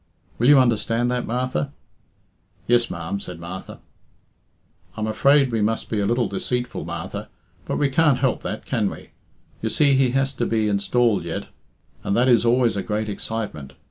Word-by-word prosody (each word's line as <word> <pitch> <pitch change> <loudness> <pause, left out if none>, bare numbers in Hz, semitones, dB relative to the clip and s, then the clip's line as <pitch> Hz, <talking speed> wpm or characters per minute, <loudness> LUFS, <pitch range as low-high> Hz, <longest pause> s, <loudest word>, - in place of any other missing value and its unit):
Will 120 - +3
you 145 - +8
understand 120 -1 +2
that, 125 0 -2
Martha?" 125 - -2 0.9
"Yes, 120 0 +3
ma'am," 85 +3 -4
said 90 -4 -8
Martha. 90 +2 -8 1.2
"I'm 110 - -1
afraid 135 +5 +3
we 115 -2 0
must 110 +2 -1
be 110 - -1
a 100 - +1
little 120 0 +1
deceitful, 125 +1 -3
Martha. 85 -1 -6 0.4
But - - -2
we 145 - +2
can't 145 0 +3
help 130 -2 0
that, 110 - -5
can 110 -6 0
we? - - -11 0.5
You 110 - -1
see 140 +3 +3
he 135 -1 +3
has 135 +1 +1
to 120 -3 -1
be 110 -1 +1
installed 100 0 +1
yet, 85 -1 -5 0.5
and 100 - 0
that 125 +2 +3
is 120 -2 +4
always 120 -1 +3
a 100 - -1
great 105 +2 -2
excitement. 100 -10 -5
115 Hz, 175 wpm, -23 LUFS, 100-125 Hz, 1.2 s, you